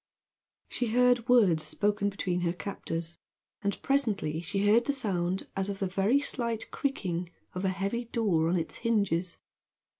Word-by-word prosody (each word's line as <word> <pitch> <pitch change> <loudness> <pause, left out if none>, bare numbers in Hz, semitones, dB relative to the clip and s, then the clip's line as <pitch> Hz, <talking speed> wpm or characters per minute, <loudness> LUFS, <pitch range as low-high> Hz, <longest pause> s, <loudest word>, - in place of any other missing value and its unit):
She 245 - -2
heard 245 +1 +3
words 200 -10 +5
spoken 205 +3 0
between 180 -3 -2
her 170 -1 0
captors, 170 -3 -5 0.4
and 200 -1 -1
presently 210 - +1
she 195 +4 -1
heard 230 +5 +4
a - - +4
sound 190 -7 -1
as 195 +1 0
of 200 - -3
the 195 - -1
very 195 +8 +2
slight 235 -5 -3
creaking 180 -11 -2 0.2
of 185 - -4
a - - +3
heavy 195 +6 -2
door 195 -9 +1
on 180 - +2
its 165 - -3
hinges. 200 -7 0
200 Hz, 155 wpm, -29 LUFS, 180-235 Hz, 0.4 s, words